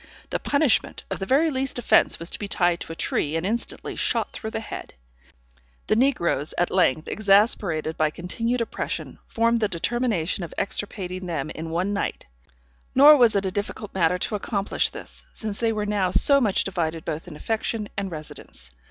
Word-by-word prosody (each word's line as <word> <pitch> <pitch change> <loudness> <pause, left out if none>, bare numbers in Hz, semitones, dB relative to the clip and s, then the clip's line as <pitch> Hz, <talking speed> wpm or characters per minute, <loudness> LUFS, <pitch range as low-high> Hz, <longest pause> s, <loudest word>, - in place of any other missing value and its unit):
The - - 0
punishment 285 -4 +1
of - - -3
the 195 - -4
very 305 +5 +3
least 265 -1 0
offence 245 - +3
was 165 +1 -5
to - - -4
be 205 - -4
tied 175 -3 +1
to - - -7
a - - -6
tree, 155 -1 -1
and 165 +2 -1
instantly 230 +4 -3
shot - - 0
through 220 - -5
the 220 - -3
head. 220 - -8 0.9
The - - +2
negroes, 215 - +1
at 175 - +1
length, 160 -4 +2
exasperated 195 -6 +2
by 155 -1 +2
continued 230 +10 -2
oppression, 230 - -4
formed 230 +1 +2
the 215 - +2
determination 195 -2 -1
of 170 - -8
extirpating 185 -2 -3
them 155 -3 -3
in 160 +1 -6
one 180 +5 -1
night; 200 - -3 0.7
nor 290 +3 +9
was 240 -5 +5
it 200 -1 +1
a 190 - -1
difficult 205 +1 -4
matter 180 -1 +2
to 180 - -1
accomplish 205 -1 0
this, - - -8
since 215 -2 -4
they 230 -1 +2
were 210 -1 -2
now 205 -3 +1
so 280 - +5
much 210 -6 +2
divided 165 -4 -2
both 160 +1 -4
in 165 - -9
affection 220 +3 -2
and 195 -1 -2
residence. 155 - -8
200 Hz, 185 wpm, -24 LUFS, 170-225 Hz, 0.9 s, nor